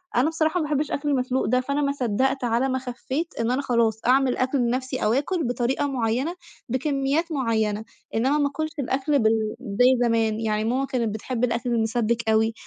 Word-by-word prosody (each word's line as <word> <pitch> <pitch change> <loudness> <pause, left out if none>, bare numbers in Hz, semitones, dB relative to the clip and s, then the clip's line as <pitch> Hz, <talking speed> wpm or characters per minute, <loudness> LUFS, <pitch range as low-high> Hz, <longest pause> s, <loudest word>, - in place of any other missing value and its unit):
أنا 250 +6 +3
بصراحة 320 +1 0
ما - - 0
باحبش 295 0 -1
أكل 290 +1 -1
المسلوق 260 -1 0
ده، 255 +2 +2
فأنا 280 +3 -1
ما 280 - +1
صدّقت 265 +1 0
على 240 +3 +1
ما 260 0 0
خفّيت 260 +5 -4
إن 230 +1 +1
أنا 260 +2 +1
خلاص 230 -4 +1
أعمل 260 0 +3
أكل 260 +2 +1
بنفسي، 255 +1 -1
أو 215 - +3
آكل 320 +6 0
بطريقة 245 +3 0
معيّنة، 260 +5 -1 0.3
بكميات 275 +5 0
معيّنة، 220 -5 0 0.3
إنّما 260 +6 +2
ما 290 -1 +2
آكُلش 310 +2 -3
الأكل 275 +2 +1
بال 220 -1 +1
زي 245 +4 +3
زمان، 225 -1 +1
يعني 215 -1 0
ماما 255 +4 0
كانت 235 -6 -1
بتحب 235 +2 -4
الأكل 235 0 0
المِسبِّك 230 0 0
أوي، 220 +1 +3
255 Hz, 185 wpm, -24 LUFS, 230-275 Hz, 0.3 s, أنا